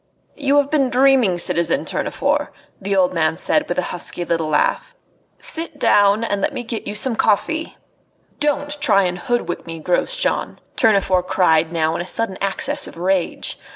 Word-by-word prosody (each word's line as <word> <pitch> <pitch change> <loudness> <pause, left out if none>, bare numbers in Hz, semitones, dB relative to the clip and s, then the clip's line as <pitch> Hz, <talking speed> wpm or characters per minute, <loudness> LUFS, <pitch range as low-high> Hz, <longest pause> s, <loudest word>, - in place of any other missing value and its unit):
"You 285 0 +1
have 285 0 +2
been 275 -4 +2
dreaming, 255 -7 +3
citizen 170 +10 +1
Tournefort," - - -1 0.3
the 195 +1 -1
old 185 -1 +2
man 160 -1 0
said, 300 0 0
with - - -2
a 180 - +1
husky 175 0 -5
little 165 -2 -1
laugh. 155 - 0 0.4
"Sit 330 0 -1
down, 205 +2 +3
and 205 -3 -1
let - - -1
me 245 - -3
get 230 -1 -5
you 205 - -4
some 235 +2 +2
coffee 320 +11 0 0.3
" - - -40
"Don't 290 0 -1
try 205 -9 +4
and 180 -1 -2
hoodwink 240 -5 -3
me, 165 0 -6
Grosjean!" 335 - 0 0.2
Tournefort 190 -4 +2
cried 160 -3 +2
now 160 -1 0
in - - -2
a 175 - -7
sudden 195 -2 -1
access 195 -1 0
of - - -12
rage. 185 0 -1
200 Hz, 175 wpm, -19 LUFS, 175-270 Hz, 0.4 s, try